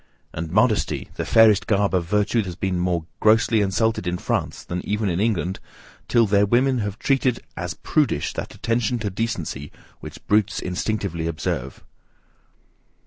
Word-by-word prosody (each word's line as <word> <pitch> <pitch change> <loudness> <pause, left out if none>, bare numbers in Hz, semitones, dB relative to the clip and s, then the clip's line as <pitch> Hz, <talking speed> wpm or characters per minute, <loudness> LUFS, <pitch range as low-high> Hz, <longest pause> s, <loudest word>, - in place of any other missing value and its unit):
And, 80 0 -4
modesty, 105 +2 +1
the - - -4
fairest 110 -3 +5
garb 100 -2 +2
of 90 -2 +1
virtue 105 +5 +1
has 90 -2 -6
been 95 0 -1
more 90 -2 0
grossly 110 0 +4
insulted 100 0 0
in 90 0 -1
France - - -2
than 90 0 -4
even 105 0 -1
in 85 0 -1
England, 95 -4 0 0.5
till 120 -2 +4
their 100 0 +3
women 125 +3 +2
have 105 -1 -3
treated 130 -2 +1 0.2
as - - -4
PRUDISH - - 0
that - - -6
attention 120 +1 0
to 105 -3 -3
decency 90 - -3 0.3
which - - -11
brutes 105 0 +2
instinctively 90 -2 -2
observe. 80 -5 -4
105 Hz, 150 wpm, -23 LUFS, 90-115 Hz, 0.5 s, fairest